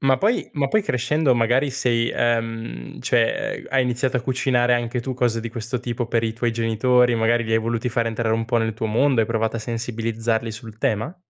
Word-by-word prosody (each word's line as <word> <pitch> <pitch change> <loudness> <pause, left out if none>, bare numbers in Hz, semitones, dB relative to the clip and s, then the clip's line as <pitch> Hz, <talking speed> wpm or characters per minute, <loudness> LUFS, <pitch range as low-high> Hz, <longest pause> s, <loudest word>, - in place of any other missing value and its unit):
Ma, 135 -1 +3
poi 220 +4 +1
ma, 140 -2 0
poi 215 - +2
crescendo, 135 - +1
magari, 125 +4 +2
sei 120 -3 0
ehm, 115 - -2
cioè - - +1
ehm, - - -14
hai 135 -1 +3
iniziato 125 +1 0
a - - -4
cucinare 125 -1 +2
anche 120 +1 -1
tu 130 +2 -4
cose 120 -2 0
di 115 - -5
questo 115 +1 -4
tipo 120 -1 -3
per 115 -1 0
i 110 - -1
tuoi 120 0 -1
genitori, 120 +2 +2
magari, 115 +1 +2
li 110 - -3
hai 110 - +4
voluti 115 +1 -1
far 115 -1 0
entrare 110 0 0
un 115 - -1
po' 120 +1 +1
nel 110 -1 -1
tuo 110 - -3
mondo, 120 +3 +2
hai 110 - +1
provato 115 0 -1
a - - -3
sensibilizzarli 115 0 -2
sul 115 -1 -9
tema? 110 - -1
120 Hz, 220 wpm, -22 LUFS, 115-125 Hz, -, hai